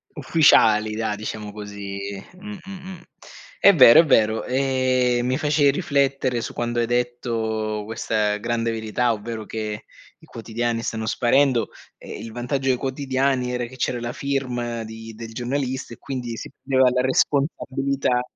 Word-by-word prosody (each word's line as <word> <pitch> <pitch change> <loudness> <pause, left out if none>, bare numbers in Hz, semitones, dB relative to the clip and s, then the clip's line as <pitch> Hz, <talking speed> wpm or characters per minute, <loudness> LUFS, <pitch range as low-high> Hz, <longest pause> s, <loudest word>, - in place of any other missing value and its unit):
Ufficiali 110 -9 +4
dai, 110 -2 -1
diciamo 105 0 -6
così, 100 -1 -7 0.3
mh, 205 +3 -9
mh, 195 - -9
mh. 185 -2 -9 0.6
È 200 -1 +7
vero, 130 -4 +9
è 165 - +6
vero, 110 -5 +3
ehm, 130 -2 +1
mi 130 +1 0
facevi 150 -2 +3
riflettere 140 -5 0
su - - -5
quando 120 0 -2
hai 115 - +2
detto 115 -3 -2
questa 105 -1 -1
grande 115 +1 -1
verità, 115 +2 0
ovvero 110 0 -6
che 105 -1 -5 0.3
i - - -19
quotidiani 115 0 -3
stanno 110 -1 -3
sparendo, 125 +1 +2 0.3
e - - -9
il 115 - -8
vantaggio 130 +3 -2
dei 125 - +3
quotidiani 130 -1 -1
era 125 -1 -2
che 130 - -11
c'era 125 -1 -1
la 120 0 -4
firma 125 -5 -2
di 110 0 -9
del 115 +1 -9
giornalista 130 0 -3
e - - -12
quindi 125 -4 -5
si - - -7
prendeva 130 -2 +4
la 125 0 +1
responsabilità 135 -1 0
120 Hz, 155 wpm, -23 LUFS, 110-135 Hz, 0.6 s, vero